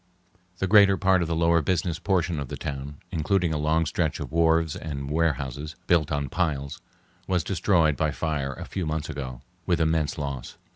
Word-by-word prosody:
The 95 Hz, -, 0 dB
greater 100 Hz, 0 st, +6 dB
part 95 Hz, -1 st, +3 dB
of 85 Hz, -, 0 dB
the 85 Hz, -, -1 dB
lower 85 Hz, 0 st, +3 dB
business 85 Hz, +1 st, -1 dB
portion 90 Hz, -5 st, 0 dB
of 70 Hz, -, -4 dB
the -, -, -6 dB
town, 70 Hz, 0 st, -5 dB
including 85 Hz, +1 st, +1 dB
a 75 Hz, -, -1 dB
long 80 Hz, +2 st, +2 dB
stretch 80 Hz, 0 st, -1 dB
of -, -, -6 dB
wharves 80 Hz, -1 st, +2 dB
and 70 Hz, -3 st, -5 dB
warehouses 75 Hz, -2 st, -1 dB
built 80 Hz, -4 st, +2 dB
on 70 Hz, -1 st, -1 dB
piles, 75 Hz, -3 st, -2 dB, 0.5 s
was 90 Hz, -3 st, +1 dB
destroyed 85 Hz, -5 st, +2 dB
by 80 Hz, -, +1 dB
fire 70 Hz, -3 st, -2 dB
a -, -, -8 dB
few 90 Hz, -4 st, -4 dB
months 80 Hz, 0 st, -2 dB
ago, 65 Hz, -4 st, -6 dB, 0.3 s
with 85 Hz, -2 st, +2 dB
immense 80 Hz, -2 st, +1 dB
loss. 70 Hz, -4 st, -5 dB
80 Hz, 185 wpm, -26 LUFS, 75-85 Hz, 0.5 s, greater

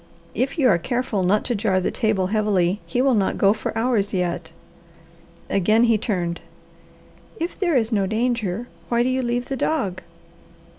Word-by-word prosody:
If 270 Hz, +5 st, -1 dB
you 275 Hz, -5 st, +4 dB
are 180 Hz, -8 st, +4 dB
careful 240 Hz, +1 st, -1 dB
not 195 Hz, +4 st, +2 dB
to 245 Hz, -, 0 dB
jar 200 Hz, -3 st, +1 dB
the 185 Hz, -, -1 dB
table 215 Hz, -5 st, 0 dB
heavily 205 Hz, -3 st, +1 dB
he 250 Hz, -, 0 dB
will 270 Hz, -1 st, +3 dB
not 200 Hz, -4 st, +1 dB
go 200 Hz, 0 st, +4 dB
for -, -, -4 dB
hours 225 Hz, -4 st, 0 dB
yet." 175 Hz, -2 st, -2 dB, 1.0 s
Again 215 Hz, +4 st, +3 dB
he 230 Hz, -2 st, +3 dB
turned. 175 Hz, -6 st, -2 dB, 1.0 s
"If 335 Hz, +2 st, -4 dB
there 350 Hz, -6 st, +1 dB
is 225 Hz, -1 st, 0 dB
no 200 Hz, -3 st, +1 dB
danger, 230 Hz, -1 st, -1 dB, 0.2 s
why 235 Hz, 0 st, +2 dB
do 250 Hz, -, 0 dB
you 260 Hz, 0 st, 0 dB
leave 245 Hz, 0 st, -1 dB
the 270 Hz, -, -3 dB
dog?" 205 Hz, -, -1 dB
220 Hz, 170 wpm, -22 LUFS, 190-245 Hz, 1.0 s, you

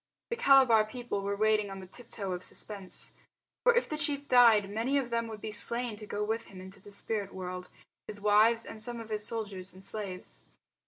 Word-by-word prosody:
The -, -, +1 dB
Calabar 270 Hz, -, +6 dB
people 240 Hz, -2 st, -4 dB
were 200 Hz, +1 st, -1 dB
waiting 215 Hz, -1 st, +2 dB
on 195 Hz, 0 st, -7 dB
the 190 Hz, -, -9 dB
tip 235 Hz, +6 st, -14 dB
toe 195 Hz, -4 st, -3 dB
of 180 Hz, 0 st, -3 dB
suspense. 200 Hz, -3 st, -4 dB, 0.5 s
For 485 Hz, -1 st, +6 dB
if 480 Hz, -, +2 dB
the 305 Hz, -, -3 dB
chief 285 Hz, -1 st, 0 dB
died 230 Hz, -5 st, +6 dB
many 230 Hz, +7 st, 0 dB
of 255 Hz, -4 st, -1 dB
them 230 Hz, 0 st, 0 dB
would 220 Hz, -2 st, -8 dB
be 215 Hz, -, -4 dB
slain 235 Hz, +2 st, -1 dB
to 210 Hz, 0 st, -10 dB
go 205 Hz, 0 st, -2 dB
with 225 Hz, +2 st, -2 dB
him 190 Hz, -, -12 dB
into 190 Hz, +1 st, -10 dB
the 205 Hz, -, -13 dB
spirit 200 Hz, 0 st, -2 dB
world 180 Hz, -1 st, -5 dB, 0.4 s
his 210 Hz, -, -6 dB
wives 215 Hz, +3 st, +4 dB
and 220 Hz, -, -7 dB
some 240 Hz, +1 st, -2 dB
of 225 Hz, -1 st, -8 dB
his 210 Hz, -1 st, -1 dB
soldiers 200 Hz, -5 st, -5 dB
and 190 Hz, +1 st, -11 dB
slaves. 195 Hz, -4 st, -6 dB
215 Hz, 215 wpm, -31 LUFS, 200-235 Hz, 0.5 s, Calabar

